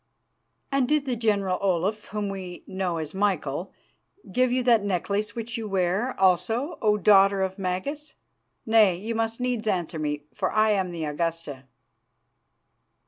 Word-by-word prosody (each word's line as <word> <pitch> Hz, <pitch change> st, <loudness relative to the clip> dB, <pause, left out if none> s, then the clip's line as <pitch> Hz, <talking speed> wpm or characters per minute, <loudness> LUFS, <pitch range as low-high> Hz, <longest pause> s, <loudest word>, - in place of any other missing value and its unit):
"'And 275 Hz, -2 st, +2 dB
did 300 Hz, 0 st, +1 dB
the 255 Hz, -3 st, -1 dB
General 200 Hz, -5 st, 0 dB
Olaf, 195 Hz, +3 st, 0 dB
whom 210 Hz, -1 st, -3 dB
we 185 Hz, -2 st, -7 dB
know 185 Hz, -3 st, -2 dB
as 155 Hz, -1 st, -5 dB
Michael, 190 Hz, -4 st, -1 dB, 0.6 s
give 255 Hz, +3 st, +2 dB
you 255 Hz, 0 st, +1 dB
that 235 Hz, -4 st, +4 dB
necklace 200 Hz, +2 st, -1 dB
which 230 Hz, 0 st, -4 dB
you 220 Hz, -, -4 dB
wear, 195 Hz, +6 st, 0 dB
also, 225 Hz, -, +1 dB
O 210 Hz, -1 st, +3 dB
Daughter 195 Hz, -1 st, +5 dB
of 190 Hz, +1 st, -3 dB
Magas? 195 Hz, +12 st, -4 dB, 0.5 s
Nay, 220 Hz, -5 st, +5 dB
you 215 Hz, +6 st, -4 dB
must 225 Hz, +1 st, -1 dB
needs 245 Hz, -3 st, -2 dB
answer 175 Hz, -5 st, -1 dB
me, 150 Hz, -1 st, -2 dB
for 185 Hz, -, -1 dB
I 215 Hz, 0 st, +3 dB
am 190 Hz, -3 st, +1 dB
the 170 Hz, -2 st, -4 dB
Augusta. 150 Hz, -3 st, -3 dB
200 Hz, 150 wpm, -26 LUFS, 180-225 Hz, 0.6 s, Daughter